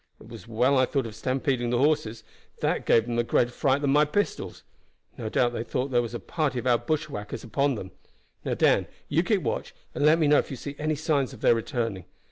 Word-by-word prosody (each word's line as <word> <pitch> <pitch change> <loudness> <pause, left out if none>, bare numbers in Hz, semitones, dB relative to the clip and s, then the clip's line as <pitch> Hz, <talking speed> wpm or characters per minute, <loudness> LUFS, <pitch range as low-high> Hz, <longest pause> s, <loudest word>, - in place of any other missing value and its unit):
It 110 - -15
was 115 -2 -11
well 125 +4 +2
I 130 - +3
thought 135 -4 -1
of 110 - -7
stampeding 130 +1 -1
the 120 - +1
horses; 140 -5 +1 0.4
that - - 0
gave 115 - +4
them 120 0 -2
a - - +3
greater 120 +1 +1
fright 135 +3 +1
than 140 -2 +1
my 150 +2 +5
pistols. 180 +8 -2 0.5
No 110 - -5
doubt 120 +2 +1
they 115 - -3
thought 125 +3 -2
that - - -13
there 120 -1 +3
was 120 0 -5
a - - -3
party 150 -6 -2
of 125 - -3
our 120 -2 +3
bushwhackers 150 -10 -3
upon 140 +3 0
them. 95 -3 -7 0.5
Now, - - -1
Dan, - - +3 0.2
you - - +3
keep - - 0
watch, - - -3 0.2
and - - -2
let 155 +2 +6
me 160 - +2
know 145 0 +5
if - - -3
you 135 - -5
see 145 +3 -7
any 155 +1 0
signs 145 -3 0
of 120 - -13
their - - +5
returning. 115 -5 -3
130 Hz, 240 wpm, -26 LUFS, 115-145 Hz, 0.5 s, let